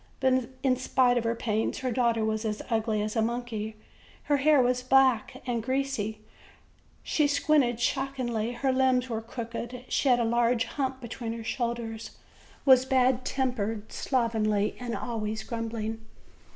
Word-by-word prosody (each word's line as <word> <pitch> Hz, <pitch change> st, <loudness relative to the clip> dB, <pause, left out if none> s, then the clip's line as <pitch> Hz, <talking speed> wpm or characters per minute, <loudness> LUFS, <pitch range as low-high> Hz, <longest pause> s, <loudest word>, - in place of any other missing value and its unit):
But 260 Hz, -2 st, +2 dB
in 255 Hz, -2 st, +3 dB
spite 250 Hz, -1 st, +3 dB
of 230 Hz, -, -5 dB
her 230 Hz, 0 st, +1 dB
pains, 220 Hz, -1 st, -1 dB
her 255 Hz, -1 st, -2 dB
daughter 230 Hz, -2 st, +1 dB
was 220 Hz, 0 st, -1 dB
as 215 Hz, -1 st, -3 dB
ugly 220 Hz, -2 st, +1 dB
as 215 Hz, +2 st, -3 dB
a 225 Hz, -, +2 dB
monkey: 225 Hz, -2 st, -3 dB, 0.5 s
her 290 Hz, -, +2 dB
hair 295 Hz, +1 st, +4 dB
was 250 Hz, 0 st, +2 dB
back 260 Hz, -3 st, +3 dB
and 240 Hz, -2 st, -1 dB
greasy; 230 Hz, -4 st, -2 dB, 0.8 s
she 300 Hz, -2 st, +2 dB
squinted 280 Hz, -5 st, +2 dB
shockingly; 245 Hz, -3 st, -1 dB
her 260 Hz, +2 st, 0 dB
limbs 260 Hz, -1 st, +2 dB
were 225 Hz, -1 st, -2 dB
crooked; 235 Hz, +2 st, -6 dB
she 275 Hz, -, +1 dB
had 245 Hz, -1 st, +5 dB
a -, -, +2 dB
large 235 Hz, +1 st, +2 dB
hump 265 Hz, -2 st, -3 dB
between 235 Hz, -1 st, -5 dB
her 230 Hz, -1 st, -6 dB
shoulders, 235 Hz, -1 st, -4 dB, 0.5 s
was 260 Hz, -2 st, +7 dB
bad 260 Hz, -1 st, +2 dB
tempered, 225 Hz, -6 st, -2 dB
slovenly, 220 Hz, -5 st, 0 dB
and 245 Hz, -2 st, -3 dB
always 220 Hz, -3 st, -3 dB
grumbling. 225 Hz, -1 st, -4 dB
240 Hz, 150 wpm, -28 LUFS, 225-260 Hz, 0.8 s, was